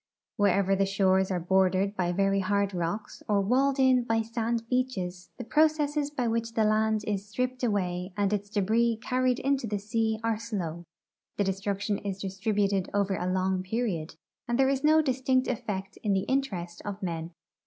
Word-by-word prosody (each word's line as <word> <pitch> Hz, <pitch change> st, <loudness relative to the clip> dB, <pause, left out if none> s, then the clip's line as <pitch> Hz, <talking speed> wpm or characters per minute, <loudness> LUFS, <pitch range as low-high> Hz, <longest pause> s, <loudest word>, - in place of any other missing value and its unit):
Wherever 195 Hz, -1 st, +3 dB
the 195 Hz, 0 st, +1 dB
shores 190 Hz, -1 st, +2 dB
are 185 Hz, -2 st, 0 dB
bordered 190 Hz, +2 st, +2 dB
by 175 Hz, -2 st, 0 dB
very 195 Hz, +2 st, +2 dB
hard 200 Hz, +1 st, 0 dB
rocks 175 Hz, +4 st, -3 dB
or 205 Hz, -1 st, +3 dB
walled 265 Hz, +7 st, +2 dB
in 260 Hz, -2 st, +4 dB
by 225 Hz, -1 st, +1 dB
sand 230 Hz, 0 st, -2 dB
beaches, 205 Hz, -9 st, -2 dB
the 245 Hz, -, -5 dB
processes 300 Hz, +2 st, +2 dB
by 260 Hz, -5 st, -2 dB
which 230 Hz, 0 st, -2 dB
the 220 Hz, -, +3 dB
land 215 Hz, 0 st, +2 dB
is 205 Hz, 0 st, -3 dB
stri}>ped 255 Hz, +2 st, -2 dB
away 185 Hz, -4 st, -1 dB
and 205 Hz, 0 st, +1 dB
its 205 Hz, 0 st, -2 dB
debris 220 Hz, +3 st, +2 dB
carried 255 Hz, +1 st, +1 dB
into 270 Hz, -3 st, 0 dB
the 205 Hz, -1 st, -1 dB
sea 220 Hz, +2 st, -1 dB
are 225 Hz, -1 st, 0 dB
slow; 175 Hz, -7 st, -4 dB, 0.5 s
the 205 Hz, -, +2 dB
destruction 200 Hz, +1 st, -1 dB
is 195 Hz, -2 st, -4 dB
distributed 195 Hz, 0 st, 0 dB
over 200 Hz, -1 st, +1 dB
a 180 Hz, 0 st, -2 dB
long 185 Hz, 0 st, 0 dB
])eriod, 185 Hz, -5 st, -2 dB, 0.3 s
and 240 Hz, 0 st, 0 dB
there 265 Hz, 0 st, +4 dB
is 275 Hz, 0 st, 0 dB
no 310 Hz, +1 st, +5 dB
distinct 260 Hz, -1 st, +1 dB
effect 195 Hz, -5 st, -4 dB
in 205 Hz, -2 st, +1 dB
the 190 Hz, -, +2 dB
interest 190 Hz, -10 st, -2 dB
of 205 Hz, -1 st, -6 dB
men. 165 Hz, -2 st, -3 dB
205 Hz, 175 wpm, -28 LUFS, 190-240 Hz, 0.5 s, no